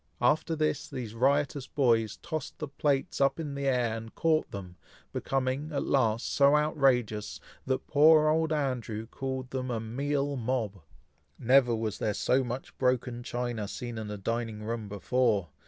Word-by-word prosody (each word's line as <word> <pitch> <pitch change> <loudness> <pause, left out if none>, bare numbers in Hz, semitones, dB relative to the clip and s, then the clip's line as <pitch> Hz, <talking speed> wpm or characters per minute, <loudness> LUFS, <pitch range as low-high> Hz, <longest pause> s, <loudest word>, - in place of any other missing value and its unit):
After 155 +6 +2
this, 155 -1 0
these 115 -4 -5
riotous 140 +2 +1
boys 115 -6 +2
tossed 155 -2 -4
the 155 - -4
plates 140 -1 -1
up 135 +2 +3
in 150 -3 -4
the 140 0 -2
air, 125 -4 +1
and 115 0 -8
caught 160 -1 +2
them, 90 -3 -8 0.4
becoming, 135 +3 -1
at 140 - -1
last, 115 -4 +1
so 140 +1 +5
outrageous, 130 -8 +1 0.3
that 130 0 -1
poor 155 +1 +6
old 160 +1 +2
Andrew 125 -7 -2
called 130 +1 -5
them 130 -1 -3
a 120 -2 -1
"meal 140 +5 -1
mob." 115 -6 -2 0.6
Never 125 -1 +4
was 110 -2 -3
there 105 -2 0
so 130 +1 +2
much 125 +1 -6
broken 125 -1 0
china 120 -3 -3
seen 120 +2 -5
in 110 -1 -5
a 105 - -4
dining 115 +1 -3
room 110 -1 -4
before! 105 -2 +1
125 Hz, 160 wpm, -29 LUFS, 115-140 Hz, 0.6 s, poor